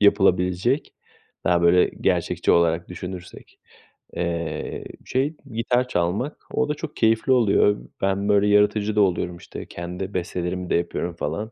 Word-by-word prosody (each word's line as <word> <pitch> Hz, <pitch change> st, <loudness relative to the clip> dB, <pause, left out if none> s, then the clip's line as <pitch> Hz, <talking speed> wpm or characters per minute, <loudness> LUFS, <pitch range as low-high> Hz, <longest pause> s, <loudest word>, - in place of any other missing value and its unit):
yapılabilecek, 95 Hz, -, +2 dB, 0.5 s
daha 85 Hz, 0 st, +3 dB
böyle 90 Hz, +1 st, +6 dB, 0.2 s
gerçekçi -, -, +1 dB
olarak 85 Hz, 0 st, +2 dB
düşünürsek, 90 Hz, 0 st, -9 dB, 0.6 s
eee, 85 Hz, -3 st, -3 dB, 0.2 s
şey 140 Hz, +5 st, 0 dB, 0.2 s
gitar 120 Hz, +2 st, +1 dB
çalmak, 100 Hz, -, -1 dB
o 150 Hz, 0 st, 0 dB
da 150 Hz, -, +1 dB
çok 150 Hz, 0 st, -7 dB
keyifli 115 Hz, +3 st, +2 dB
oluyor. 105 Hz, -4 st, +4 dB, 0.2 s
Ben 100 Hz, +1 st, 0 dB
böyle 100 Hz, 0 st, +4 dB
yaratıcı 105 Hz, +1 st, +3 dB
da 105 Hz, -, +4 dB
oluyorum, 90 Hz, -2 st, 0 dB
işte, -, -, -9 dB
kendi 90 Hz, +3 st, -6 dB
bestelerimi 90 Hz, 0 st, -3 dB
de -, -, +2 dB
yapıyorum 85 Hz, 0 st, -2 dB
falan. 105 Hz, +9 st, -3 dB
95 Hz, 135 wpm, -23 LUFS, 85-110 Hz, 0.6 s, böyle